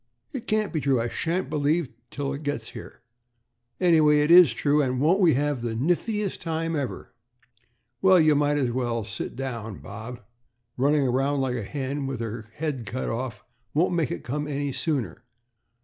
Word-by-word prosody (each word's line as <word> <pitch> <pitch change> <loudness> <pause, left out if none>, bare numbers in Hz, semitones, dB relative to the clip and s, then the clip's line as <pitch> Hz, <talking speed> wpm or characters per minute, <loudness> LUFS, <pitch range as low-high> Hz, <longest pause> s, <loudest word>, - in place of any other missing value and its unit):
"It 260 -5 -6
can't 215 -2 0
be 160 - 0
true. 135 -3 +2
I 115 +1 -1
shan't 165 +3 -1
believe 150 +3 +1
it 125 - -18 0.2
till 140 -1 -3
it 140 - -6
gets 145 -7 -3
here." - - -10 0.8
"Anyway, 155 -4 +5
it 150 +2 +2
is 175 -6 +9
true, 145 +5 +2
and 130 -2 0
won't 165 +8 +3
we 170 -8 +5
have 145 -2 0
the 115 -1 -3
niftiest 185 - 0
time 165 0 -2
ever?" 140 -4 -4 0.9
"Well, 190 -1 +6
you 155 -1 +5
might 145 0 +2
as 130 -4 +1
well 120 -2 -1
sit 100 +2 -6
down, 115 -6 -5
Bob. 110 +4 -8 0.6
Running 140 +1 +2
around 135 +3 +1
like 130 -2 -1
a 120 - -2
hen 135 +5 -3
with 135 -3 -4
her 115 -1 -5
head 145 -7 -3
cut 130 +4 -3
off 115 -2 -4 0.3
won't 175 +4 +2
make 165 -6 +1
it 85 - -5
come 150 +4 -3
any 145 -1 -2
sooner." 130 - -2
145 Hz, 180 wpm, -26 LUFS, 125-155 Hz, 0.9 s, is